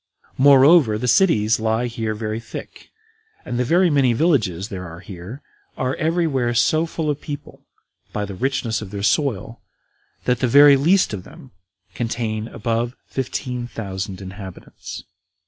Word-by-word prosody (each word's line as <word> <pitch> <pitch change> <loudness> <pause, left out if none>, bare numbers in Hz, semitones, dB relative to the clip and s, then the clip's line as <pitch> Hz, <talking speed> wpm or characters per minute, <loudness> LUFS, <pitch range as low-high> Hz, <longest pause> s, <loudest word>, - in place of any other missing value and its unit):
Moreover, 140 -3 +6
the 125 +3 -3
cities 115 - +3
lie 110 +2 0
here 115 -2 -3
very 110 0 -3
thick, 115 - -10 0.6
and 120 - -3
the - - +2
very 175 +6 +3
many 135 -4 +3
villages 110 - +1
there 90 -5 -6
are 85 +1 -10
here 100 - -9 0.3
are 130 0 -1
every 165 +2 +1
where 125 -6 0
so 155 +7 +2
full 160 -1 -4
of 145 -1 -1
people, 145 -2 -9 0.4
by 105 - -2
the 100 - -7
richness 120 0 -1
of 105 - -7
their 100 0 -5
soil, 115 -1 0 0.6
that 125 -1 +1
the 130 - +1
very 145 +3 +8
least 170 - +3
of 95 -3 -5
them 150 - -14 0.4
contain 115 -2 -3
above 115 +1 -2
fifteen 125 -2 -4
thousand 95 -4 -6
inhabitants. 95 -1 -9
120 Hz, 150 wpm, -21 LUFS, 105-140 Hz, 0.6 s, very